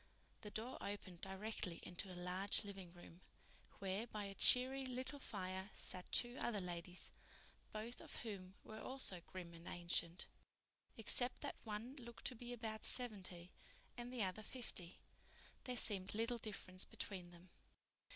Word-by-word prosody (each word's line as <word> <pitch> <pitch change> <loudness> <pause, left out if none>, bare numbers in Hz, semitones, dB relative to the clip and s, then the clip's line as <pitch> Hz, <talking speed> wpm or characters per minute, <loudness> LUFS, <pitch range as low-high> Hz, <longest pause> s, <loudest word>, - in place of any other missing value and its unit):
The 210 - -5
door 225 +5 -2
opened 195 -4 -4
directly 190 -2 -2
into 185 +2 -3
a 180 - -4
large 180 +3 +1
living 195 -4 -6
room, 175 0 -12 0.6
where 195 +4 0
by 215 -2 -2
a 200 -1 -3
cheery 260 +6 +10
little 260 +2 -1
fire 190 -4 -2
sat 185 -1 -3
two 240 +1 +4
other 235 -3 +1
ladies, 180 -1 -1 0.6
both 220 +3 -4
of - - -6
whom 190 -4 -5
were 220 0 -7
also 255 -9 +2
grim 175 -2 -6
and 165 0 -10
ancient. 170 0 +1 0.7
Except 245 +3 +1
that - - -2
one 225 +5 -3
looked 235 -2 -9
to 255 - +2
be 240 +1 -6
about 220 -2 -3
seventy 190 -7 -3 0.4
and 240 0 -4
the 245 -4 +1
other 190 +3 -1
fifty, 210 -6 -2 0.7
there 250 -1 0
seemed 195 -3 +3
little 230 +2 +2
difference 185 -4 0
between 185 -3 -4
them. 175 +1 -14
205 Hz, 150 wpm, -43 LUFS, 185-235 Hz, 0.7 s, cheery